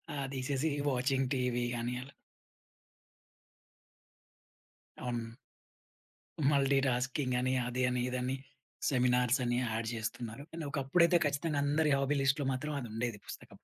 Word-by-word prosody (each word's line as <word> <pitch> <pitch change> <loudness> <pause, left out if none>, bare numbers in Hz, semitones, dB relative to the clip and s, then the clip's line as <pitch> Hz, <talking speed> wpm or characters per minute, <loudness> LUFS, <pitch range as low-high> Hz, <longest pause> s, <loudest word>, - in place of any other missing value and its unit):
ఆ! - - -3 0.2
తీసేసి 135 +3 0 0.2
watching 130 +1 +1
TV 125 -1 0
అని 120 +1 -2
అలా. 140 +2 -11 2.9
అవును. 120 -2 -3 1.2
మల్టీ 140 -1 +3
టాస్కింగని 130 0 0
అదని 125 0 0
ఇదని 125 +1 -1 0.5
సెమినార్సని 125 -1 +2
యాడ్ 115 -1 -1
జేస్తున్నారు. 115 +3 -4
కానీ 165 -1 -5
ఒకప్పుడైతే 170 +5 +4
ఖచ్చితంగా 145 +1 0
అందరి 150 +2 +2
హాబీ 140 +1 +1
లిస్ట్‌లో 135 0 +2
మాత్రం 150 +3 -3
అదుండేది 115 -1 -3
పుస్తకం. - - -9
130 Hz, 100 wpm, -33 LUFS, 125-140 Hz, 2.9 s, ఒకప్పుడైతే